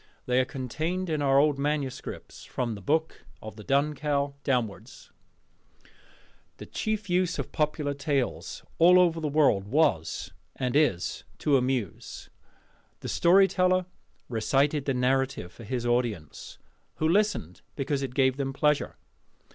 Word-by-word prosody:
They 125 Hz, 0 st, +2 dB
are 130 Hz, -, +2 dB
contained 160 Hz, +8 st, -3 dB
in 155 Hz, -2 st, 0 dB
our 135 Hz, -1 st, +3 dB
old 145 Hz, 0 st, +3 dB
manuscripts, 145 Hz, -2 st, -4 dB
from 120 Hz, -3 st, -3 dB
the 100 Hz, -, -8 dB
Book 160 Hz, +8 st, -1 dB, 0.2 s
of 110 Hz, 0 st, -9 dB
the 105 Hz, -, -10 dB
Dun 140 Hz, +4 st, +1 dB
Cow 145 Hz, -1 st, -1 dB
downwards. 120 Hz, -7 st, -3 dB, 1.5 s
The -, -, -9 dB
chief 215 Hz, -1 st, -3 dB
use 180 Hz, -1 st, +1 dB
of -, -, -4 dB
popular 150 Hz, -2 st, -1 dB
tales 140 Hz, -2 st, -2 dB, 0.2 s
all 180 Hz, +1 st, +6 dB
the 160 Hz, -1 st, -4 dB
world 140 Hz, -10 st, +3 dB
over 120 Hz, -, -6 dB
was 90 Hz, -, +1 dB, 0.2 s
and 125 Hz, 0 st, -2 dB
is 145 Hz, -, +1 dB
to 145 Hz, -, +2 dB
amuse. 125 Hz, -7 st, -2 dB, 0.7 s
The -, -, -5 dB
storyteller 185 Hz, 0 st, +4 dB, 0.4 s
recited 135 Hz, +5 st, +1 dB
the 135 Hz, -, 0 dB
narrative 130 Hz, -7 st, 0 dB
for 115 Hz, -, -12 dB
his 120 Hz, +2 st, -3 dB
audience, 120 Hz, -, -2 dB, 0.4 s
who 155 Hz, -, 0 dB
listened 190 Hz, -, 0 dB
because 140 Hz, 0 st, -1 dB
it 130 Hz, -2 st, -5 dB
gave 130 Hz, -1 st, +3 dB
them 135 Hz, -1 st, -2 dB
pleasure. 150 Hz, +1 st, +1 dB
140 Hz, 140 wpm, -27 LUFS, 125-155 Hz, 1.5 s, all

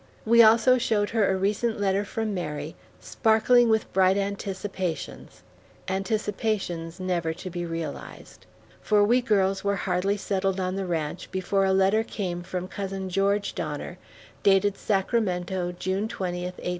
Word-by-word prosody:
We 235 Hz, +1 st, +6 dB
also 230 Hz, +3 st, +6 dB
showed 215 Hz, -4 st, 0 dB
her 220 Hz, -3 st, +2 dB
a 190 Hz, -, +1 dB
recent 210 Hz, +4 st, 0 dB
letter 200 Hz, 0 st, +1 dB
from 215 Hz, +1 st, -3 dB
Mary, 150 Hz, -4 st, -4 dB, 0.2 s
sparkling 230 Hz, +2 st, +3 dB
with 220 Hz, -1 st, 0 dB
bright 190 Hz, +1 st, +4 dB
anticipations 195 Hz, -3 st, -4 dB, 0.4 s
anticipations 195 Hz, -3 st, -2 dB
never 175 Hz, -3 st, -1 dB
to 185 Hz, +1 st, -7 dB
be 175 Hz, 0 st, -4 dB
realized; 165 Hz, 0 st, -7 dB, 0.3 s
for 210 Hz, -1 st, +3 dB
we 240 Hz, +5 st, +3 dB
girls 195 Hz, -5 st, +1 dB
were 200 Hz, 0 st, +1 dB
hardly 195 Hz, +2 st, 0 dB
settled 195 Hz, -1 st, -1 dB
on 185 Hz, 0 st, -1 dB
the 195 Hz, -1 st, -3 dB
ranch 160 Hz, -1 st, -3 dB
before 195 Hz, +1 st, 0 dB
a 190 Hz, -, +2 dB
letter 195 Hz, +3 st, +3 dB
came 180 Hz, -6 st, -4 dB
from 180 Hz, +1 st, -5 dB
cousin 195 Hz, -1 st, -5 dB
George 200 Hz, +2 st, +1 dB
Donner, 155 Hz, +4 st, -5 dB, 0.4 s
dated 200 Hz, 0 st, +3 dB
Sacramento, 190 Hz, -4 st, -1 dB
June 190 Hz, +4 st, -1 dB
20, 180 Hz, -4 st, -4 dB
1860. 180 Hz, 0 st, -5 dB
195 Hz, 145 wpm, -26 LUFS, 180-210 Hz, 0.4 s, We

